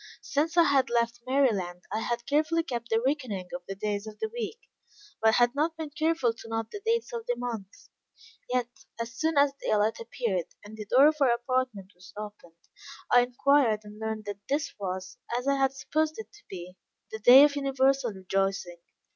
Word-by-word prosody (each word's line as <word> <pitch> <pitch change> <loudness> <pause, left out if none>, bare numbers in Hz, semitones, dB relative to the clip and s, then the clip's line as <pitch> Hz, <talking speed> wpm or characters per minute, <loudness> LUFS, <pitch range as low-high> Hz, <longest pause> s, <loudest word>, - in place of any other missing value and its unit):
Since 315 +4 -1
I 340 - +8
had 280 -4 +3
left 235 0 0
Maryland 205 -10 +1
I 215 - -1
had 235 +1 -2
carefully 310 +3 +1
kept 235 -7 -5
the 225 - +3
reckoning 255 -10 -1
of 175 - -4
the 195 - -5
days 205 +1 -3
of 215 - -9
the 440 - -3
week, 475 -1 -4 0.6
but 220 0 +5
had 240 0 +4
not 315 +3 0
been 315 -2 -5
careful 310 -6 +1
to 225 - -12
note 225 0 -3
the 415 - -7
dates 465 +2 0
of 465 0 -5
the - - +1
month; 225 - -7 0.6
yet 250 -1 +1 0.3
as 230 +1 -4
soon 315 +4 -1
as 280 -1 +5
daylight 215 +1 +1
appeared, 230 -6 -2 0.2
and 210 +1 -10
the 215 -1 -8
door 265 +6 +6
of 305 0 +4
our 270 - +5
apartment 240 -5 -2
was 180 +1 -16
opened, 205 -5 -9 0.5
I 245 - +7
inquired 245 -2 +2
and 210 0 -12
learned 220 -1 -4
that 205 -1 -5
this 285 +1 -1
was, 185 -1 -5 0.2
as 250 +2 -4
I 280 - +4
had 270 -1 +2
supposed 310 +3 -1
it 440 - -9
to 420 - -17
be, 180 0 -9 0.3
the 220 - -5
day 250 +5 +9
of 290 -1 +4
universal 270 -3 +1
rejoicing. 190 -2 -2
240 Hz, 195 wpm, -28 LUFS, 210-285 Hz, 0.6 s, day